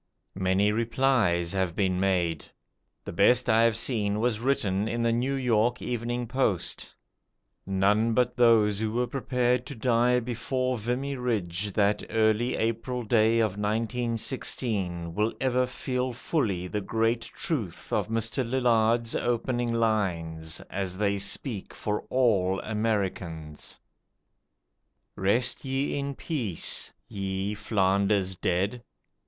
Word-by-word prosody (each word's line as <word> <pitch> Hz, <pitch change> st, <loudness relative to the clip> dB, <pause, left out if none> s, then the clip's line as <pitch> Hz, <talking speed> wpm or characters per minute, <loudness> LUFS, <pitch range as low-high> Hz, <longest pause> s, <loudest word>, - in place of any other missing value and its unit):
Many 95 Hz, +2 st, +2 dB
"replies" 115 Hz, -7 st, +1 dB
have 95 Hz, -3 st, -1 dB
been 95 Hz, -2 st, +1 dB
made. 90 Hz, -4 st, +1 dB, 0.6 s
The -, -, -6 dB
best 120 Hz, +8 st, +4 dB
I 115 Hz, -1 st, +4 dB
have 115 Hz, -2 st, +3 dB
seen 105 Hz, -4 st, 0 dB
was 115 Hz, -1 st, +1 dB
written 110 Hz, -6 st, 0 dB
in 115 Hz, +1 st, -1 dB
the 115 Hz, -, +2 dB
'New 125 Hz, +4 st, 0 dB
York 120 Hz, -2 st, +1 dB
Evening 120 Hz, 0 st, -3 dB
Post'. 110 Hz, -8 st, -1 dB, 0.7 s
None 105 Hz, +4 st, +2 dB
but 125 Hz, 0 st, +2 dB
those 110 Hz, -4 st, +4 dB
who 110 Hz, 0 st, -1 dB
were 125 Hz, +1 st, +1 dB
prepared 125 Hz, -1 st, 0 dB
to 140 Hz, -, -7 dB
die 125 Hz, +1 st, +2 dB
before 125 Hz, +2 st, -2 dB
Vimy 125 Hz, +5 st, -2 dB
Ridge 105 Hz, -6 st, -2 dB
that 105 Hz, 0 st, +2 dB
early 110 Hz, +2 st, +2 dB
April 115 Hz, +2 st, -2 dB
day 110 Hz, 0 st, +3 dB
of 110 Hz, -3 st, 0 dB
1916 110 Hz, -5 st, -1 dB
will 105 Hz, +4 st, 0 dB
ever 125 Hz, -1 st, +1 dB
feel 125 Hz, 0 st, -2 dB
fully 110 Hz, -, -1 dB
the 105 Hz, +3 st, -3 dB
great 115 Hz, +3 st, 0 dB
truth 115 Hz, -, -4 dB
of -, -, +1 dB
Mr. 115 Hz, +2 st, -1 dB
Lillard's 115 Hz, -2 st, +2 dB
opening 120 Hz, 0 st, 0 dB
lines, 85 Hz, -8 st, 0 dB
as 95 Hz, -1 st, -4 dB
they 100 Hz, -1 st, +1 dB
speak 100 Hz, +2 st, -3 dB
for 105 Hz, 0 st, -2 dB
all 100 Hz, -7 st, +2 dB
Americans: 95 Hz, -8 st, -3 dB, 1.4 s
"Rest 110 Hz, +6 st, +1 dB
ye 135 Hz, +1 st, -1 dB
in 140 Hz, -1 st, -3 dB
peace, 120 Hz, -, -1 dB, 0.2 s
ye 95 Hz, +1 st, -3 dB
Flanders 100 Hz, -2 st, +1 dB
dead. 95 Hz, +7 st, -1 dB
110 Hz, 125 wpm, -27 LUFS, 100-125 Hz, 1.4 s, best